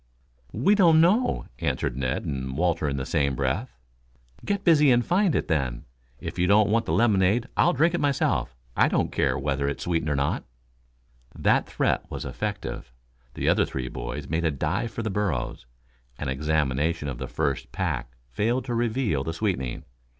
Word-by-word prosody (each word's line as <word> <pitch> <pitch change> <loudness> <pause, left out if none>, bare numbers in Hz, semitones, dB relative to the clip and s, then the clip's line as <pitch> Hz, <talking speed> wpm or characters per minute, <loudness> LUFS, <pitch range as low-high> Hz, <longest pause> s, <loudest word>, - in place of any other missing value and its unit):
"We 130 - +3
don't 170 -6 +6
know," 205 +10 +3
answered - - -1
Ned 65 -1 -2
and 65 -1 -4
Walter 85 -3 +1
in 70 - -2
the 65 - -3
same 70 -2 0
breath. 70 - -1 0.7
"Get 200 -1 -1
busy 150 -4 +5
and 120 -1 +4
find 185 -2 +2
it, - - 0
then. 65 -7 -1 0.3
If - - -6
you 90 - +3
don't 105 +1 +4
want 115 +1 +1
this - - 0
lemonade 110 0 +3
I'll 175 - +4
drink 160 +5 +3
it 175 - 0
myself. 140 - 0 0.2
I - - +4
don't - - 0
care - - +1
whether 70 0 -1
it 70 - -3
is - - -7
sweetened 80 -3 0
or 70 - +1
not." 70 +1 0 0.9
That - - +2
threat - - 0
was - - -5
effective. - - -4 0.4
The - - -2
other - - +4
three 65 -2 -4
boys 65 +4 -5
made 80 +2 -1
a 80 - +3
dive 80 - -1
for 115 - -5
the 110 - -2
burros. 75 -13 -2 0.5
An 75 - -4
examination 75 +2 0
of 65 -4 -5
the 65 - -4
first - - -2
pack 60 -1 -3
failed 115 - -1
to 125 - -3
reveal 115 - 0
the 80 - -3
sweetening. 85 - -2
85 Hz, 180 wpm, -26 LUFS, -, 0.9 s, don't